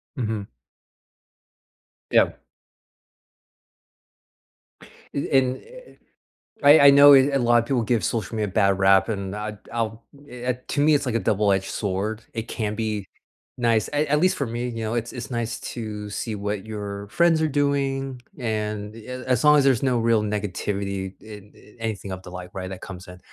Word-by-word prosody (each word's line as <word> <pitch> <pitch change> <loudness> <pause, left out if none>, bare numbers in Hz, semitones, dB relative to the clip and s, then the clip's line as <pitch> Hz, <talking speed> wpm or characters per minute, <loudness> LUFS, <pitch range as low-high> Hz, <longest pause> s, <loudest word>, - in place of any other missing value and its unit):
Mhm. 110 -5 -3 1.6
Yep. - - +3 2.7
Eh, 140 - -2
and, 130 0 +1
eh - - -17 0.3
eh, - - -21 0.7
I 145 +2 +8
I - - +11
know 140 0 +9
a 135 +1 +4
lot 120 -1 +3
of 115 - -2
people 125 -2 0
give 115 -3 0
social 110 +4 -2
media 105 -1 -1
bad 100 0 +2
rap, 95 +3 +4
and 100 -2 -3
I'd 105 0 -5 0.2
I'll, 115 -1 -3 0.3
eh 125 0 -3
eh, - - -1 0.2
to 145 - 0
me, 155 +1 +5
it's 140 -1 +2
like 115 - -1
a - - +2
double 105 -2 +1
edged 95 0 0
sword. 105 +2 -3
It 115 0 -4
can 105 -4 -3
be 105 -3 -3 0.5
nice. 115 -3 +1
At 150 +1 +1
at 150 +1 +2
least 185 +2 +3
for 140 - -1
me, 120 +2 -3
you 115 -1 -5
know, 110 +1 -2
it 120 0 -2
it's 125 0 -7
nice 120 -1 -3
to 105 -3 -6
see 110 +1 -3
what 100 0 -4
your 100 -2 -6
friends 170 +1 +3
are 160 - +2
doing 135 -3 -1 0.2
and, 105 -2 -3
eh, 125 +3 -8
as 125 0 +1
long 150 0 +7
as 140 - +4
there's 130 -4 +3
no 130 -2 +2
real 115 -1 +3
negativity 100 -1 -3
in, 105 -2 -12
eh, 105 - -19
anything 105 -4 -4
of 95 0 -6
the - - -10
like, 90 0 -8
right, 95 -1 -5
that 95 -1 -8
comes 95 -1 -9
in. 90 0 -11
110 Hz, 185 wpm, -24 LUFS, 100-125 Hz, 2.7 s, I